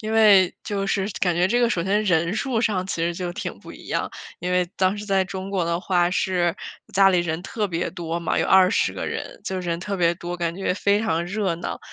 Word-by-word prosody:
因 215 0 -4
为 205 -5 +6
就 200 -1 -2
是 195 0 0
感 175 -2 +2
觉 180 +2 +2
这 240 +3 +2
个 240 - +4
首 170 -7 0
先 205 +3 +1
人 170 -1 +2
数 245 -2 -1
上 190 -5 0
其 - - -3
实 170 +1 +1
就 175 0 -4
挺 - - -5
不 - - -11
一 - - -13
样。 - - -1 0.3
因 180 0 -3
为 180 0 +3
当 190 +2 +2
时 205 - -6
在 195 -2 +2
中 190 0 -6
国 190 -3 0
的 170 +1 -1
话 180 -2 +2
是 180 -2 +1 0.4
家 195 0 +6
里 180 - +3
人 160 -1 -2
特 210 +1 -2
别 175 -2 -2
多 170 -1 -4
嘛， 170 - 0
有 - - +1
20 190 +1 +4
个 - - -4
人， - - -5
就 190 -1 -3
人 170 -1 -3
特 200 +2 -3
别 170 -1 +2
多， 175 0 -6
感 170 -1 -2
觉 190 0 -1
非 200 +2 +2
常 170 -6 0
热 195 -1 -1
闹。 175 - -5
185 Hz, 255 characters per minute, -23 LUFS, 175-200 Hz, 0.4 s, 为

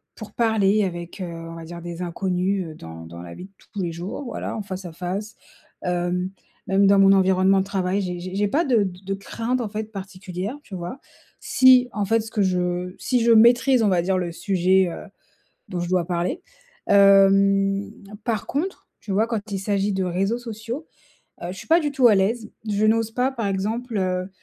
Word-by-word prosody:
pour 220 - -10
parler 215 -3 +2
avec, 175 0 -5
heu, - - -2
on 165 -1 -8
va 165 - -8
dire 170 +1 -8
des 175 0 -7
inconnus, 185 +2 -1
heu, - - -12
dans 80 - -10
dans 85 +1 -10
la 85 -1 -9
vie 180 - -9
de 195 - -17 0.2
tous 205 - -3
les 175 -2 -2
jours, 175 - -6
voilà, 240 - -5
en 215 - -4
face 190 -1 -7
à 175 - -6
face. 185 +5 -5 0.5
Hem, 180 +1 -1 0.4
même 195 +1 +3
dans 200 0 +5
mon 195 0 +7
environnement 190 0 +4
de 190 - 0
travail, 195 0 -1
j'ai 180 -2 -4
j'ai 185 +1 -7
j'ai 205 +1 +1
pas 300 +11 +1
de 240 -7 +3
d 180 -2 -5
de 195 - -2
craintes, 230 +5 -3
en 225 - -3
fait, 215 +1 -5
particulières, 190 +3 -6
tu 205 - -14
vois? 175 +9 -6 0.4
Si, 255 -1 +5
en 205 -1 -1
fait, 225 +3 +2
ce 220 +1 -9
que 210 - 0
je 180 -1 -1
si 250 -1 +1
je 235 - +4
maîtrise, 240 +2 +5
on - - +3
va 180 -2 +2
dire, 185 +2 0
le 175 -2 -2
sujet, 185 +1 +2
heu, - - -8 0.6
dont 180 - -3
je 175 - -3
dois 180 -1 +1
parler. 175 0 -2 0.5
Hem, 195 0 +5 0.3
par 225 -4 -1
contre, 335 +8 -3
tu 205 - -5
vois, 210 +4 +2
quand 220 -2 -4
il 195 - -1
s'agit 200 +1 0
de 190 0 0
réseaux 195 +6 0
sociaux, 235 +5 -6 0.6
heu, 170 - -4
je - - -10
suis - - -11
pas 330 +1 +6
du 295 -3 -2
tout 260 -3 +5
à 215 - +5
l'aise. 220 +3 0 0.2
Je 210 0 +1
n'ose 225 0 +2
pas, 250 +3 +1
par 230 -5 -3
exemple, 220 +5 -2
heu 185 -1 -1
195 Hz, 215 wpm, -23 LUFS, 180-220 Hz, 0.6 s, mon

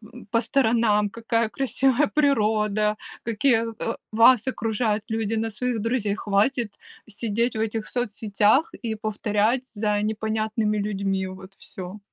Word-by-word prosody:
м, 245 - -12
по 230 -1 +3
сторонам, 225 -4 +2
какая 230 +1 -1
красивая 270 +4 +1
природа, 215 -7 +2 0.3
какие, 230 +1 +2 0.2
э, 230 - -2 0.2
вас 230 +2 +5
окружают 220 -3 -1
люди, 225 0 -1
на 225 0 -1
своих 240 +2 -2
друзей. 225 -3 0
Хватит 210 +2 0 0.3
сидеть 230 +2 -1
в - - -2
этих 220 0 -2
соцсетях 220 +3 +1
и 220 -1 -1
повторять 215 +3 0
за 210 0 0
непонятными 215 0 -1
людьми 195 -2 -1
вот 190 +1 -11
всё". 185 +2 -9
220 Hz, 130 wpm, -24 LUFS, 210-235 Hz, 0.3 s, вас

